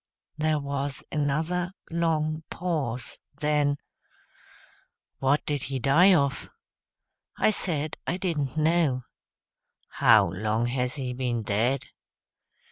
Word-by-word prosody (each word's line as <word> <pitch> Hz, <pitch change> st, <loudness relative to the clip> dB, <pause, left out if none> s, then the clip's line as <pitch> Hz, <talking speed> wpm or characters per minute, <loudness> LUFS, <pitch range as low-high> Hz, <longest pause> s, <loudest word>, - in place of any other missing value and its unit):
There 155 Hz, 0 st, +1 dB
was 140 Hz, -1 st, -3 dB
another 160 Hz, +5 st, -1 dB, 0.2 s
long 160 Hz, -2 st, 0 dB
pause; 145 Hz, -9 st, -3 dB, 0.2 s
then, 150 Hz, -1 st, +2 dB, 1.4 s
"What 135 Hz, +2 st, +2 dB
did 145 Hz, -2 st, -1 dB
he 135 Hz, -, -2 dB
die 160 Hz, +10 st, +5 dB
of?" 140 Hz, -3 st, 0 dB, 0.9 s
I -, -, +4 dB
said 155 Hz, -7 st, -1 dB
I 180 Hz, -, 0 dB
didn't 155 Hz, -7 st, -2 dB
know. 155 Hz, -5 st, +2 dB, 0.9 s
"How -, -, +5 dB
long 110 Hz, +4 st, -1 dB
has 125 Hz, +1 st, -1 dB
he 130 Hz, -3 st, -3 dB
ben 125 Hz, -3 st, -2 dB
dead?" 115 Hz, +6 st, +1 dB
145 Hz, 105 wpm, -27 LUFS, 130-160 Hz, 1.4 s, die